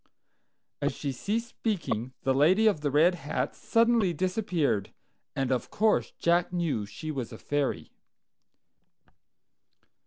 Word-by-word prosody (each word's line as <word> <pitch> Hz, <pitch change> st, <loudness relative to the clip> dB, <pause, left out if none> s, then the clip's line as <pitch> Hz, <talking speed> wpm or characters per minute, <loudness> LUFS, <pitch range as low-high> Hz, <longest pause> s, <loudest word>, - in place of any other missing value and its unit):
As -, -, 0 dB
she 140 Hz, -, -3 dB
ceased 220 Hz, -, -2 dB
speaking, 130 Hz, -, -2 dB
the 135 Hz, -, +2 dB
lady 175 Hz, +11 st, +4 dB
of 205 Hz, -9 st, +3 dB
the 145 Hz, -, 0 dB
red 155 Hz, +6 st, +4 dB
hat 150 Hz, -4 st, -3 dB
suddenly 230 Hz, -5 st, +2 dB
disappeared, 175 Hz, -, 0 dB, 0.4 s
and 135 Hz, -1 st, -1 dB
of 125 Hz, -, -1 dB
course 215 Hz, 0 st, +2 dB
Jack 170 Hz, +1 st, +2 dB
knew 160 Hz, -, -1 dB
she 155 Hz, +10 st, -6 dB
was 130 Hz, -5 st, -4 dB
a 110 Hz, -, -8 dB
fairy. 145 Hz, +1 st, -2 dB
160 Hz, 125 wpm, -28 LUFS, 135-195 Hz, 0.4 s, lady